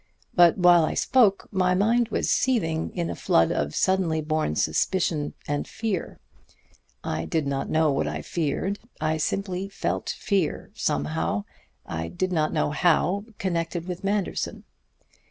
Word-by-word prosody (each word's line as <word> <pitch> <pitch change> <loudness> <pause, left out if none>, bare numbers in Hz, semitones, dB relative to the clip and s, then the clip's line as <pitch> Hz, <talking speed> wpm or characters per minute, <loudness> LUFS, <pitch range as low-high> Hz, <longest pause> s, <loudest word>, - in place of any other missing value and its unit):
But 175 -2 +6
while 175 -2 +6
I - - -1
spoke 220 -7 +3
my 185 -2 +2
mind 230 +5 +3
was - - -1
seething 165 -11 +1
in 170 -1 -1
a - - -4
flood 80 - +3
of 75 0 -1
suddenly 185 -4 +2
born 155 - -1
suspicion 150 - 0
and 145 0 -2
fear. 215 -6 -3 0.8
I 80 - -2
did 160 -3 -1
not 140 -1 -2
know 160 -1 +3
what 135 - 0
I - - -4
feared. 175 +5 -2 0.2
I 155 0 0
simply 190 +3 -2
felt 195 - -3
fear, 195 -7 -1
somehow 80 +7 -1 0.4
I 80 0 -4
did 185 - -2
not 155 -2 +1
know - - 0
how 180 +5 +2
connected 170 -1 -2
with 180 0 -5
Manderson. 200 -1 -2
170 Hz, 145 wpm, -25 LUFS, 150-190 Hz, 0.8 s, But